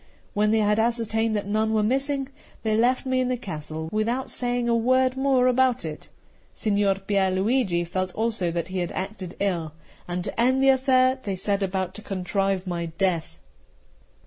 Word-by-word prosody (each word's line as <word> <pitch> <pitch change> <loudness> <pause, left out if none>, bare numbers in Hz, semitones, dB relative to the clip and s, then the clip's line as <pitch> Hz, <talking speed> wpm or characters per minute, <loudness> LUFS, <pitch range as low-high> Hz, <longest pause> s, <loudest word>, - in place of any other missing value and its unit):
When 210 -1 +2
they 220 0 +3
had 210 +1 +2
ascertained 225 -1 +1
that 205 - -1
none 215 +2 0
were 215 - +2
missing, 270 +3 0 0.3
they 220 -1 +1
left 245 +4 +2
me 260 0 +1
in 255 - +1
the 250 0 0
castle 160 -5 -6
without 230 +5 -1
saying 245 -1 -1
a 235 - +3
word 255 +2 +3
more 265 -1 +3
about 255 -3 +2
it. 155 -1 -7 0.5
Signor 200 -3 +1
Pier 195 0 0
Luigi 190 -2 +1
felt 185 +2 -2
also 220 -5 0
that 170 +1 -3
he 185 0 -3
had 175 -1 -2
acted 190 -2 -5
ill; 170 -6 -1 0.3
and 180 0 -3
to 230 - -2
end 260 +2 +3
the 270 - +6
affair, 260 0 +4
they 200 -6 -3
set 200 +2 0
about 190 -1 -1
to 215 - -8
contrive 195 0 -1
my 170 -2 -3
death. 165 - -1
210 Hz, 180 wpm, -25 LUFS, 185-250 Hz, 0.5 s, the